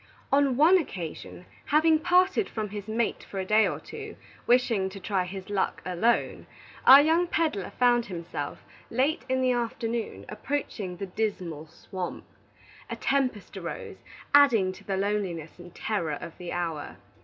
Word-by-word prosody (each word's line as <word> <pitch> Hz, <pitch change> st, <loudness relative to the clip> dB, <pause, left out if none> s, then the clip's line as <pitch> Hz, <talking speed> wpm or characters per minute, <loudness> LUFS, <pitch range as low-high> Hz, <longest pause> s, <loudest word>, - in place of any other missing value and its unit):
On 275 Hz, -2 st, +3 dB
one 340 Hz, +6 st, +6 dB
occasion, 180 Hz, -, -7 dB, 0.2 s
having 315 Hz, +1 st, +4 dB
parted 370 Hz, +5 st, +3 dB
from 215 Hz, -2 st, -4 dB
his 205 Hz, 0 st, -7 dB
mate 225 Hz, +1 st, -1 dB
for 195 Hz, -, -9 dB
a 190 Hz, -, -2 dB
day 215 Hz, +2 st, +4 dB
or -, -, -3 dB
two, -, -, -9 dB, 0.3 s
wishing 235 Hz, -6 st, +3 dB
to 195 Hz, +1 st, -9 dB
try 190 Hz, -1 st, -1 dB
his 190 Hz, +2 st, -8 dB
luck 200 Hz, -2 st, 0 dB
alone, 185 Hz, +6 st, 0 dB, 0.4 s
our 270 Hz, +2 st, +11 dB
young 325 Hz, +4 st, +3 dB
peddler 315 Hz, -, -1 dB
found 240 Hz, -1 st, +3 dB
himself, 170 Hz, -5 st, -6 dB, 0.3 s
late 270 Hz, +6 st, +1 dB
in 260 Hz, 0 st, +1 dB
the 255 Hz, -1 st, +3 dB
afternoon, 235 Hz, -1 st, -3 dB
approaching 210 Hz, -6 st, -4 dB
the 195 Hz, -, -4 dB
Dismal 180 Hz, -6 st, -3 dB
Swamp. 180 Hz, +3 st, -7 dB, 0.6 s
A -, -, -3 dB
tempest 260 Hz, -7 st, -1 dB
arose, -, -, -6 dB, 0.4 s
adding 240 Hz, -10 st, +6 dB
to 185 Hz, -, -13 dB
the 195 Hz, -1 st, -2 dB
loneliness 190 Hz, -6 st, -2 dB
and 175 Hz, 0 st, -11 dB
terror 170 Hz, -9 st, -2 dB
of 170 Hz, -, -9 dB
the 175 Hz, -1 st, -6 dB
hour. 165 Hz, -4 st, -4 dB
215 Hz, 155 wpm, -27 LUFS, 185-260 Hz, 0.6 s, our